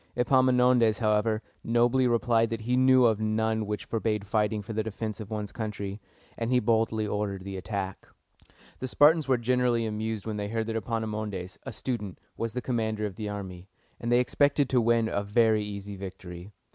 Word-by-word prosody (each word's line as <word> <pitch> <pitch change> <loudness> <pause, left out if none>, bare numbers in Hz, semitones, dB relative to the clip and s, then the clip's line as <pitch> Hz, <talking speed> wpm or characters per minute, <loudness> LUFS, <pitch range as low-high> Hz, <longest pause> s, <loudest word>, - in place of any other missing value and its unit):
Epaminondas, 125 -3 +4
however, 110 0 +1 0.2
nobly 120 +2 +3
replied 115 -1 +2
that 115 -1 -4
he 125 +3 0
knew 130 0 +5
of 110 -2 +2
none 110 0 0
which 105 0 -3
forbade 110 -2 -1
fighting 105 0 0
for 110 - -6
the 110 - 0
defense 110 0 -5
of 105 -2 -7
one's 105 -2 -4
country, 105 -2 -5 0.4
and 115 0 -1
he 125 0 +4
boldly 110 -1 +1
ordered 105 -2 -2
the 100 0 -6
attack. 95 0 -5 0.7
The 130 - -3
Spartans 150 +3 +4
were 130 -2 +3
greatly 120 -1 +1
amused 110 -1 -3
when 110 -1 -3
they 105 0 -3
heard 110 +1 -2
that 115 0 -4
Epaminondas, 105 -4 -3
a - - -3
student, 105 -5 -4 0.2
was 115 -1 -3
the 125 0 -3
commander 110 -3 -1
of 100 -3 -5
the 110 -2 -4
army, 95 -3 -7 0.3
and 120 - -3
they 120 - +5
expected 140 +2 +2
to 125 -2 +3
win 115 0 +3
a 100 - -1
very 110 +1 +2
easy 100 -1 -6
victory. 95 -1 -9
110 Hz, 185 wpm, -28 LUFS, 105-120 Hz, 0.7 s, knew